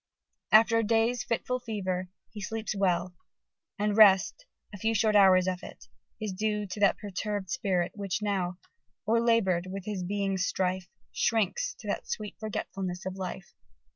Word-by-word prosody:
After 230 +1 +6
day's 225 +2 +1
fitful 250 +2 -2
fever 190 -6 -3 0.2
he 210 - -8
sleeps 220 +1 -3
well: 180 -2 +1 0.6
and 210 0 0
rest, 210 - +5 0.3
a 205 - -8
few 225 +3 0
short 215 0 +2
hours 190 -2 +6
of 185 -1 -2
it, - - -11 0.3
is 215 -3 -3
due 210 +1 -1
to 195 +2 -7
that 200 -1 +4
perturbed 205 -1 -4
spirit, 190 -9 0
which 195 -1 -3
now,... 190 -4 -1 0.5
O'erlabour'd 225 -6 +2
with 195 0 -6
his 205 -4 -3
being's 195 0 -1
strife, 185 0 -1 0.2
Shrinks 360 - 0
to - - -10
that - - -3
sweet 210 -1 -4
forgetfulness 190 -4 -4
of 190 - -3
life 185 -1 -6
200 Hz, 150 wpm, -29 LUFS, 185-220 Hz, 0.6 s, After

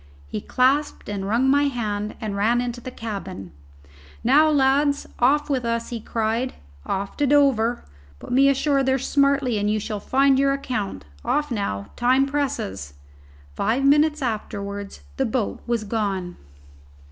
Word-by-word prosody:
He 85 +9 -5
clasped 270 +2 +1
and 195 -1 -3
wrung 235 +5 +2
my 285 +2 +4
hand 215 -6 -2
and 210 -3 -4
ran 225 +4 +2
into 245 0 -3
the 255 - -6
cabin. 195 - -7 0.7
"Now, 295 +6 +5
lads, 285 0 +2
off 290 +4 +3
with 270 -4 -1
us!" 230 0 -2
he 235 - -4
cried. 225 +3 -2 0.3
"Off 195 +1 -3
to 290 - +2
Dover! 255 -5 +3 0.3
Put - - -10
me 275 +2 +5
ashore 275 +1 +2
there 265 0 +2
smartly 275 -3 +1
and 205 +1 0
you 215 0 +1
shall 210 0 -4
find 270 +4 +3
your 275 0 +3
account. 100 - -4 0.2
Off 295 -2 0
now 100 - -3
time 255 +3 +3
presses." 100 - -3 0.6
Five 240 - 0
minutes 295 +1 +4
afterwards 200 - -4 0.2
the - - +1
boat 100 - -2
was 235 -2 0
gone. 200 -5 -2
240 Hz, 150 wpm, -23 LUFS, 205-275 Hz, 0.7 s, Now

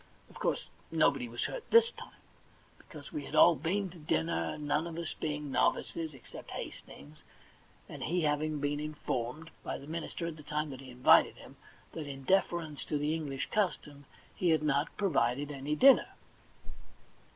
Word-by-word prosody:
Of - - -13
course - - 0 0.2
nobody - - +2
was - - -3
hurt - - -5
this 465 0 +6
time, - - -13 0.6
because - - -12
we 305 - -4
had - - -6
all 175 - +8
been 190 +4 -1
to 175 - -13
dinner, 80 - -1
none 150 +2 0
of 165 -1 -7
us 170 -2 -4
being 150 -2 -4
novices 160 +2 0
except 130 - -11
Hastings, 75 +2 -9 0.7
and - - -9
he 175 +2 0
having 150 0 0
been 145 0 -1
in 150 0 -4
formed 140 +4 -3
by - - -3
the 140 - -11
minister 165 +2 -4
at 165 -2 -5
the - - -10
time 150 0 -2
that 130 0 -8
he 130 - -11
invited 125 0 +5
him - - -14 0.4
that 155 -3 -6
in 135 -1 -7
deference 170 -3 +1
to 150 - -1
the 150 +2 0
English 145 -4 -3
custom 150 -8 -1 0.3
he 180 - +1
had 160 -2 +3
not 145 +1 0
provided 145 - +1
any 145 +2 -2
dinner. 270 - +7
150 Hz, 175 wpm, -32 LUFS, 140-165 Hz, 0.7 s, all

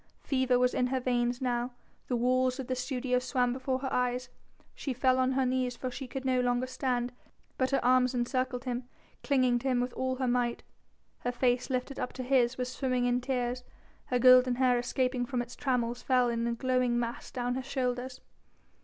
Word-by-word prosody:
Fever 260 -2 +2
was 250 0 +2
in 250 - +1
her 260 +1 0
veins 245 0 0
now, 245 0 -1 0.3
the 250 - 0
walls 255 +2 +1
of 265 - -3
the 255 - -2
studio 250 0 -1
swam 250 -1 0
before 260 0 -1
her 265 - -3
eyes; 250 0 0 0.4
she 270 - -4
fell 255 +1 +3
on 260 0 +2
her 265 0 +2
knees 255 -1 0
for 255 +1 -4
she 265 +1 -6
could 265 +2 -6
no 255 -1 +2
longer 245 0 +1
stand, 250 -1 -1 0.5
but 260 0 +2
her 275 -3 0
arms 255 0 +4
encircled 250 +1 -1
him, 250 -1 -4 0.3
clinging 255 -3 +2
to 265 - -4
him 255 -2 +2
with 245 0 -2
all 260 0 -1
her 255 0 -1
might. 240 -1 0 0.6
Her 245 - -2
face, 245 +1 +1
lifted 255 +1 -2
up - - -3
to 255 - -5
his, 250 -1 +2
was 250 0 -2
swimming 255 -2 0
in 245 0 +1
tears, 250 -1 -2 0.4
her 250 - 0
golden 255 0 +6
hair 250 -1 +3
escaping 250 +1 0
from 245 0 -2
its 240 0 -5
trammels 245 -3 -1
fell 250 -2 +3
in 235 0 -1
a 235 - 0
glowing 250 0 +1
mass 235 0 -3
down 245 -1 -2
her 260 - -2
shoulders. 255 -1 -3
250 Hz, 200 wpm, -30 LUFS, 245-260 Hz, 0.6 s, golden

